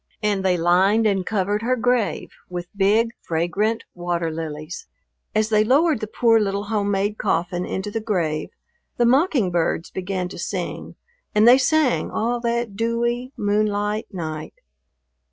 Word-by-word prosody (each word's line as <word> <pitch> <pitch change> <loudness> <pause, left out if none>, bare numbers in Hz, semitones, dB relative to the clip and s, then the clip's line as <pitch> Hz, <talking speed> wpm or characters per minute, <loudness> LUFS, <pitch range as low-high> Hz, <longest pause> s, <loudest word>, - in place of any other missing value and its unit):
And 205 -2 +1
they 185 -2 +2
lined 190 +6 +3
and 195 -3 +2
covered 205 +1 -1
her 250 +2 +1
grave 245 -2 0 0.2
with 175 +1 -7
big, 210 +4 +3
fragrant 195 +7 -1
water 175 -2 -2
lilies. 155 - -6 0.5
As 215 0 +2
they 215 -1 +4
lowered 285 +4 +3
the 215 - -4
poor 225 +1 +3
little 200 -1 -1
home 205 -1 -1
made 205 +1 -1
coffin 175 -2 -1
into 190 +2 -4
the 225 +1 -3
grave 170 -8 -1 0.5
the 240 - +3
mockingbirds 235 - +1
began 185 -1 -3
to - - -9
sing - - -4 0.4
and 215 +2 +5
they 250 +2 +8
sang 300 -1 +2
all 240 +2 -1
that 235 -3 -2
dewy, 235 +3 -1
moonlight 210 +1 0
night. 155 -5 -6
205 Hz, 145 wpm, -22 LUFS, 180-230 Hz, 0.5 s, they